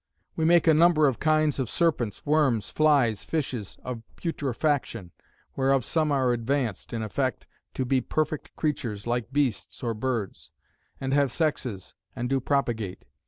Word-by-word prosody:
We 160 - 0
make 170 0 +5
a 160 - +6
number 160 -1 +5
of 130 - -1
kinds 155 -2 +2
of 130 - -1
serpents, 140 - 0
worms, 145 -8 +2
flies, 140 -9 +3
fishes, 130 -10 -3
of 125 -3 -5
putrefaction; 140 - -2 0.4
whereof 135 -2 +2
some 155 -2 +1
are 130 -3 +2
advanced 120 -3 -2
(in 115 -2 -3
effect) 105 - -2 0.3
to 130 - -1
be 130 +1 +2
perfect 155 +4 -2
creatures, 120 -9 -2
like 120 0 -2
bests 135 -5 -1
or 115 -1 0
birds; 115 -3 -3 0.5
and 135 0 -2
have 140 -3 +3
sexes, 125 - -2 0.2
and 125 0 -3
do 135 - +3
propagate. 120 -8 -1
135 Hz, 150 wpm, -26 LUFS, 115-150 Hz, 0.5 s, a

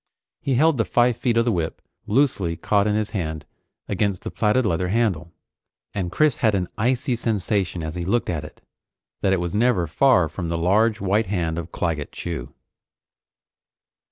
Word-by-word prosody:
He 135 - 0
held 155 +3 +4
the - - +4
five 120 0 +3
feet 120 -3 0
of 115 - +3
the 120 - +2
whip 85 -5 -2 0.3
loosely 105 -8 +1
caught 100 +4 +1
in 105 - +1
his 110 0 -1
hand 80 -7 -3 0.4
against 100 -2 -1
the - - -5
plaited 115 +3 +2
leather 90 -1 0
handle, 95 -5 0 0.6
and 90 -4 -3
Chris 155 - +2
had 110 -3 +2
an 90 -2 -1
icy 125 +3 0
sensation 100 -6 -1
as 80 0 -4
he 90 0 -4
looked 105 +7 0
at 80 -4 -2
it 75 - -12 0.6
that 95 - +2
it 95 - +2
was 85 0 -3
never 110 -4 +2
far 90 - +3
from 85 +2 -5
the 85 - -1
large 105 +6 +2
white 100 +2 +1
hand 85 -4 -1
of 85 0 -7
Claggett 80 -4 -2
Chew. 85 -2 -5
100 Hz, 180 wpm, -23 LUFS, 85-115 Hz, 0.6 s, held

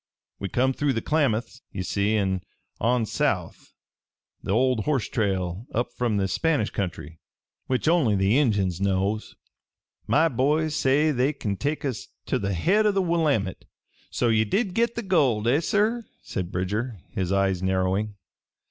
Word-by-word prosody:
"We 100 - -4
come 130 +5 +1
through 145 0 0
the 115 - -1
Klamaths, 125 -5 0
ye 95 - -4
see, 100 +3 0
an' 95 -3 0 0.4
on 120 +1 +2
south - - -2 0.7
the - - -9
old 125 +1 +2
horse 140 -6 0
trail 95 -1 -2
up 120 +1 -1
from 120 -4 0
the 95 -1 +1
Spanish 145 - 0
country, 80 -4 -5 0.5
which 130 +3 0
only 155 -11 +3
the 95 +3 +2
Injuns 100 - +1
knows. 100 +2 -1 0.7
My 165 - +4
boys 150 +3 +1
say 150 +3 +3
they 135 +2 +1
kin 105 -8 -3
take 145 +8 -2
us 125 -6 -3 0.2
ter - - 0
the 100 -1 -2
head 205 - +3
o' - - +4
the 195 - 0
Willamette. 150 - 0 0.4
"So 120 - 0
ye 110 -1 +3
did 190 - 0
get 235 +2 +1
the 235 - -3
gold! 135 - +2
Eh, 135 +5 +4
sir?" 215 +7 +1 0.2
said 90 -2 -4
Bridger, 105 +6 -2
his 95 -1 -2
eyes 95 -2 +1
narrowing. 95 +3 0
115 Hz, 160 wpm, -25 LUFS, 100-150 Hz, 0.7 s, My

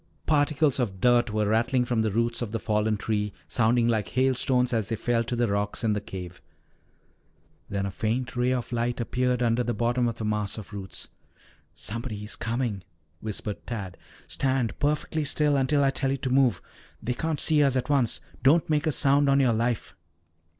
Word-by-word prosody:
Particles 145 -2 +2
of 100 -7 -2
dirt 120 +2 +4
were 105 0 0
rattling 120 +4 +2
from 120 -2 0
the 110 - +1
roots 115 +3 0
of 115 -4 -3
the 115 - -2
fallen 105 0 0
tree, 105 -1 -1 0.2
sounding 120 0 +2
like 110 -3 +1
hailstones 130 -1 +2
as 110 -3 0
they 115 - 0
fell 115 +1 0
to 120 +1 -3
the 120 0 +1
rocks 100 +2 -2
in 110 -2 +2
the 105 - -2
cave. 90 -3 -8 1.3
Then 100 -1 -2
a 100 - -3
faint 120 +6 -2
ray 125 +1 +1
of 125 -1 -2
light 120 +1 -1
appeared 125 +1 0
under 120 +1 +2
the 120 -1 -2
bottom 120 +3 +1
of 115 - -2
the 110 - -5
mass 105 -1 -1
of 105 -1 -9
roots. 95 -2 -7 0.7
"Somebody 110 +1 -5
is 105 - -6
coming," 115 -4 -2 0.4
whispered 105 -1 -5
Tad. 100 -6 -5 0.3
"Stand 130 -4 -1
perfectly 150 +1 0
still 150 0 +2
until 140 +1 +2
I 135 - +3
tell 135 0 -1
you 135 - 0
to 130 -1 -3
move." 130 -2 +3 0.4
"They 125 +3 -1
can't 160 +2 -2
see 155 -2 +4
us 135 -2 +3
at 130 - 0
once. 135 -5 +2 0.2
Don't 155 +5 +4
make 150 +1 +1
a - - +3
sound 140 0 +3
on 140 0 +4
your 130 -4 +3
life." 115 0 -1
120 Hz, 190 wpm, -26 LUFS, 110-130 Hz, 1.3 s, dirt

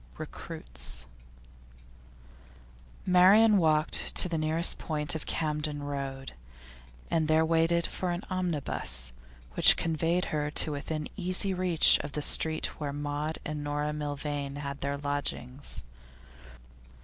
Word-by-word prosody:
RECRUITS - - -6 2.0
Marian 195 +4 +5
walked 155 -2 +1
to - - +4
the 165 -3 -3
nearest 160 +2 +2
point 150 -2 -1
of 160 - -6
Camden 150 -2 -2
Road, 135 -2 -6 0.8
and 160 -2 +1
there 160 +1 +3
waited 165 +1 +1
for 185 - -4
an 175 +3 -3
omnibus, 145 - -3 0.4
which - - +7
conveyed 165 +2 -1
her 150 -1 -1
to 150 - +1
within 150 +1 -4
easy 185 +1 +1
reach 180 -3 +5
of 145 0 -7
the 150 - -2
street 160 +1 +3
where 145 -2 -3
Maud 145 +2 -4
and 150 -2 -5
Dora 145 +1 -2
Milvain 145 -1 -4
had 140 -1 -6
their 140 0 -2
lodgings. 145 -2 -1
150 Hz, 120 wpm, -28 LUFS, 145-165 Hz, 2.0 s, which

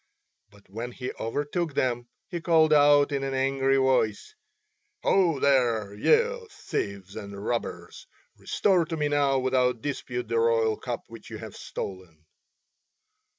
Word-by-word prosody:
But 100 -1 -21
when 115 +5 -6
he 125 0 -5
overtook 145 +6 -2
them 120 -1 0 0.2
he 175 -2 -5
called 160 -2 +4
out 145 0 +5
in 140 -1 -1
an 135 0 -2
angry 135 0 +2
voice: 130 -5 +1 0.7
"Ho, 170 -7 +3
there, 120 -7 +2
ye 470 - +2
thieves 100 - -5
and 100 -1 -7
robbers. 120 -1 -4 0.3
Restore 185 -4 +1
to 165 0 -4
me 150 -1 0
now 140 -2 +2
without 125 -2 +1
dispute 125 -4 -4
the 115 - 0
royal 115 -1 +2
cup - - -5
which - - -12
you - - -7
have - - -9
stolen." 90 -5 -8
130 Hz, 140 wpm, -26 LUFS, 115-145 Hz, 0.7 s, out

